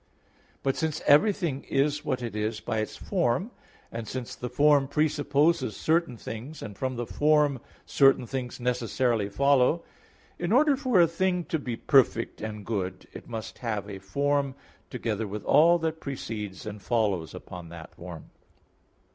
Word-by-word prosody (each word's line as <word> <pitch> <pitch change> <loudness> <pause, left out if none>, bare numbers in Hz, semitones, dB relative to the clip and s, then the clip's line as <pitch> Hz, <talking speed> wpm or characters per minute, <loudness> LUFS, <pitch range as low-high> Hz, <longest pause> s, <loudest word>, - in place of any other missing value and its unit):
But 135 -1 +1
since 160 -2 -1
everything 170 -3 +3
is 145 +2 +1
what 130 -4 -2
it 115 -3 -5
is 105 +1 -2
by 110 - -2
its 110 - -4
form 180 - 0 0.4
(and 115 -1 -5
since 130 0 -5
the 125 - -5
form 140 +2 +4
presupposes 145 - +1
certain 160 -6 +1
things, 125 +9 -7
and 105 -2 -7
from 130 +4 -2
the 120 0 -3
form 150 0 +2 0.3
certain 135 -3 +4
things 125 0 -5
necessarily 120 -3 0
follow), 140 +7 +3 0.6
in 175 +2 -2
order 285 +4 +5
for 255 -7 +2
a 170 - +7
thing 180 +2 0
to 160 - -2
be 125 -4 -4
perfect 120 -2 +2
and 105 -1 -5
good 95 -4 -3
it - - -10
must 115 -2 -6
have 105 -4 -3
a 100 -2 -7
form, 140 +7 0 0.3
together 110 -4 -2
with 105 +1 -6
all 165 +4 +6
that 160 -1 -2
precedes 110 -8 -5
and 105 -1 -7
follows 100 - 0
upon 90 -2 -9
that 85 -1 -10
form. 85 -2 -10
130 Hz, 155 wpm, -27 LUFS, 110-150 Hz, 0.6 s, a